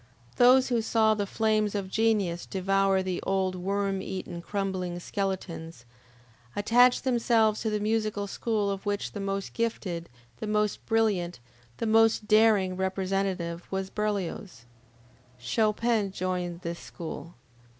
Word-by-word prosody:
Those 255 +1 +6
who 240 -2 +2
saw 220 -1 +3
the 205 -2 -2
flames 215 -1 +1
of 200 -2 -2
Genius 200 -5 0
devour 195 0 +1
the 185 -1 -2
old 190 -1 0
worm 195 +1 -1
eaten 185 -3 -5
crumbling 185 -2 -3
skeletons, 175 - -4 0.7
attached 245 +4 +4
themselves 230 -4 +2
to 220 - 0
the 210 0 -1
musical 215 -1 0
school 210 0 -1
of 195 +1 -5
which 205 0 -1
the 205 - -6
most 195 0 -3
gifted, 185 -7 -3 0.3
the 215 - -5
most 210 -1 0
brilliant, 205 - +1 0.4
the - - -2
most 225 -1 +3
daring 215 -4 +4
representative, 190 -2 -2
was 190 0 -3
Berlioz. 200 - -3 0.7
Chopin 215 - +1
joined 180 -2 -3
this 170 -1 -5
school. 170 0 -8
200 Hz, 130 wpm, -28 LUFS, 185-220 Hz, 0.7 s, Those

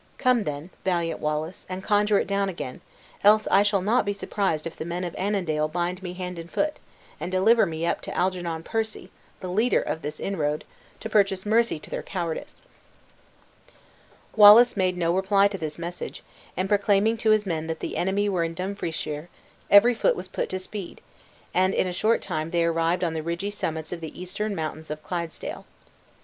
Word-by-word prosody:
Come 250 -4 +2
then, 150 +4 -5
valiant 170 -3 0
Wallace, 155 +3 -3
and 185 +1 -5
conjure 210 0 +3
it - - +1
down 200 0 0
again, 150 -8 -6 0.4
else 215 +1 +6
I 195 - +6
shall 205 -2 +2
not 230 +6 +3
be 205 - -1
surprised 195 -5 -1
if 165 - -5
the - - -5
men 175 +2 -3
of 175 - -4
Annandale 175 -6 0
bind 175 +3 -2
me 180 -1 -5
hand 180 -1 -5
and 165 0 -9
foot, 300 - -1 0.4
and 180 - -4
deliver 205 +3 +4
me 160 0 -3
up - - 0
to - - -6
Algernon 175 -3 -1
Percy 220 +2 -3 0.3
(the 185 - -5
leader 215 +7 +2
of 160 - -3
this 150 +1 -5
inroad), 150 -6 -1 0.4
to - - -4
purchase 195 -3 +2
mercy 230 -2 +2
to - - -14
their - - -3
cowardice." 180 - -5 1.7
Wallace 215 +3 +9
made 185 -2 +1
no 170 -1 +1
reply 195 +1 +4
to 200 - -5
this 155 -2 -3
message, 175 +1 -6 0.3
and 185 +1 0
proclaiming 205 +2 +3
to 220 0 0
his 215 -1 +4
men 160 -4 -2
that 160 0 -3
the - - -4
enemy 195 +3 +1
were 185 -4 +1
in 165 0 -3
Dumfriesshire, 170 -4 -4 0.4
every 210 +5 +7
foot - - +2
was - - -6
put - - -3
to - - -3
the - - -2
speed; 200 -2 -7 0.5
and 185 +1 +2
in - - +2
a 180 - -3
short 220 +5 +1
time 155 +1 -3
they 170 0 +1
arrived 165 +2 +1
on 165 -2 0
the 160 - -2
ridgy 170 +5 -3
summits 160 -6 -3
of 170 - -7
the 160 +1 -8
eastern 200 +3 -3
mountains 155 -1 -5
of 155 0 -6
Clydesdale. 170 0 -5
185 Hz, 195 wpm, -25 LUFS, 165-205 Hz, 1.7 s, Wallace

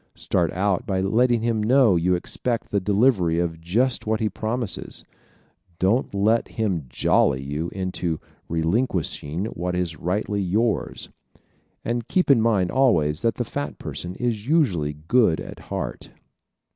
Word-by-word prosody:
Start - - 0
out 100 +5 0
by 95 -3 0
letting 115 +4 +2
him 115 -2 +1
know 120 -2 +4
you 90 +2 +2
expect 115 +6 -3
the 100 - +2
delivery 100 -4 +2
of 85 -1 -2
just 115 +9 0
what 110 0 +1
he 110 - 0
promises. 110 0 -3 0.7
Don't 100 +9 +1
let 110 +4 +2
him 95 - -2
"jolly" 65 +2 +2
you 75 +5 -3
into 90 -4 -3 0.3
relinquishing 85 - -1
what 90 -4 -3
is 85 -4 -2
rightfully 100 +3 -1
yours. 105 +4 -1 0.8
And 120 0 -2
keep 180 -6 +2
in 125 -5 +5
mind 105 -6 +2
always 80 - +2
that 115 -3 +1
the - - -2
fat 70 -2 -4
person 90 +1 -6
is 115 -3 -2
usually 100 - +2
good 110 -9 +3
at - - -8
heart. - - -4
100 Hz, 145 wpm, -23 LUFS, 85-115 Hz, 0.8 s, in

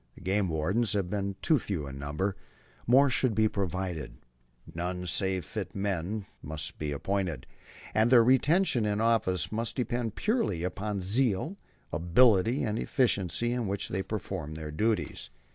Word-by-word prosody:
The - - -14
game 95 +1 +1
wardens 95 +9 +1
have 95 -3 -1
been 100 -1 -2
too 155 -4 +4
few 95 -9 -3
in 70 -1 -7
number. 75 +8 -2 0.5
More 135 +4 +6
should 130 -3 +1
be 110 0 +4
provided. 95 -5 -3 0.6
None 90 +1 -3
save 95 +1 0
fit 95 -5 -5
men 100 +1 -2 0.2
must 75 +1 -6
be 75 -1 -2
appointed; 85 -3 -2 0.5
and 110 +2 +3
their 120 -2 +7
retention 130 - +3
in 105 0 0
office 95 -7 +1
must 115 +1 -2
depend 120 -3 -2
purely 215 - 0
upon 100 +3 -2
the - - -5
zeal, 120 - +1 0.4
ability, 105 - +4
and 110 -1 -1
efficiency 120 -1 +1
with 115 - -2
which 100 +1 -2
they 95 - -1
perform 75 -4 -5
their 80 -1 -6
duties. 105 - -1
100 Hz, 155 wpm, -29 LUFS, 90-115 Hz, 0.6 s, their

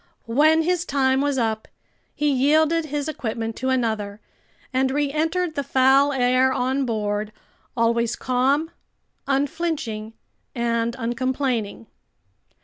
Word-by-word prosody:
When 305 +7 +4
his 355 0 +1
time 265 -3 +1
was 285 -1 0
up, 220 -3 -1 0.5
he 295 - 0
yielded 310 +5 +3
his 295 0 -3
equipment 225 -6 -4
to 260 - -2
another 220 -5 -1 0.5
and 260 +1 +2
reentered 310 +5 0
the 285 - -1
foul 270 +2 +4
air 255 0 +3
on 260 +1 0
board, 210 -1 -2 0.5
always 235 0 +1
calm, 270 +6 0 0.6
unflinching, 275 -6 -2 0.4
and 235 -1 0
uncomplaining. 245 -2 -2
260 Hz, 110 wpm, -23 LUFS, 230-290 Hz, 0.6 s, When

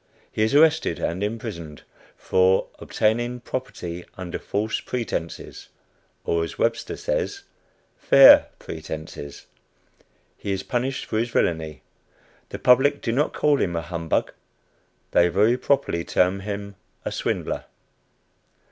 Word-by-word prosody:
He - - -3
is 110 +5 +2
arrested 160 - +4
and 85 +3 -2
imprisoned 105 - -5 0.3
"for 95 +1 +3
obtaining 120 +3 0
property 90 -9 -5
under 90 -2 -5
false 110 +2 -2
pretences" 115 -9 -5 0.5
or, 85 0 0
as 80 - -6
Webster 115 0 -1
says, 460 -5 -2 0.6
"fair 135 -1 +8
pretences." 80 -2 -8 0.9
He 100 - -4
is 95 - -3
punished 130 +1 -2
for 110 - -1
his 120 +2 -1
villainy. 80 - -1 0.7
The - - -6
public 135 +3 +4
do 115 - 0
not 140 +6 +1
call 145 -2 +2
him 85 -2 0
a 85 - -1
"humbug;" 85 0 -2 0.8
they 85 - +5
very 105 +7 +3
properly 125 -10 0
term 90 +3 +1
him 100 0 -6 0.3
a - - -2
swindler. - - -2
105 Hz, 120 wpm, -24 LUFS, 85-125 Hz, 0.9 s, fair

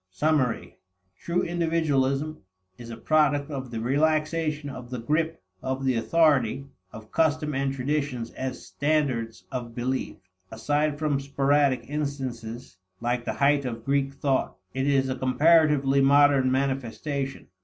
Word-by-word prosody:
Summary. 130 +4 0 0.4
True 170 +1 -1
individualism 155 -4 0 0.4
is 120 +2 -11
a 115 - -7
product 150 +1 +2
of 135 -3 -5
the 115 -1 -4
relaxation 155 +3 0
of 130 -3 -8
the 125 - -4
grip 155 - -1 0.2
of 130 +1 -3
the 130 - +3
authority 135 0 +2 0.3
of 110 -1 -12
custom 155 -1 +1
and 135 0 0
traditions 135 -3 -2
as 130 0 -5
standards 140 -7 -1
of 120 -3 -5
belief. 130 +2 -2 0.3
Aside 145 +6 0
from 150 -2 0
sporadic 140 0 +1
instances, 130 -7 -5 0.2
like 120 0 -1
the 110 - -2
height 140 +4 +3
of 115 -3 -5
Greek 140 0 +1
thought, 135 -1 0 0.2
it 135 +2 -1
is 135 -2 +2
a 130 - -1
comparatively 145 0 +4
modern 140 -1 +5
manifestation. 135 +1 -2
140 Hz, 135 wpm, -26 LUFS, 130-150 Hz, 0.4 s, modern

